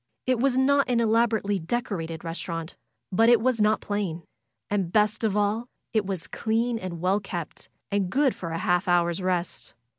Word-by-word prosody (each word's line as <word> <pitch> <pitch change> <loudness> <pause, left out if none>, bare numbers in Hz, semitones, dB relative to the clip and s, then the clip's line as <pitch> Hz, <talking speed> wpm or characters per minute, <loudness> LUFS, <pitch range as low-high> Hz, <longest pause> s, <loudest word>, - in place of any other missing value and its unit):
It 255 -2 +1
was 260 0 +2
not 280 +1 +3
an 240 -1 +2
elaborately 220 -3 +2
decorated 165 -4 -3
restaurant; 165 0 -5 0.4
but 225 +5 +4
it 240 -2 +6
was 240 -1 +1
not 215 +1 +3
plain; 195 -5 -3 0.4
and 195 -4 -1
best 215 +2 +2
of 210 -2 +1
all, 210 +3 0 0.3
it 215 -3 +1
was 190 -4 -4
clean 230 +1 -1
and 175 -4 -6
well 190 +3 +2
kept, 175 -5 -7 0.2
and 200 -2 0
good 270 +4 +2
for 170 - -6
a 165 - -3
half 180 +3 +1
hour's 175 0 +2
rest. 180 -1 -2
205 Hz, 175 wpm, -26 LUFS, 175-230 Hz, 0.4 s, it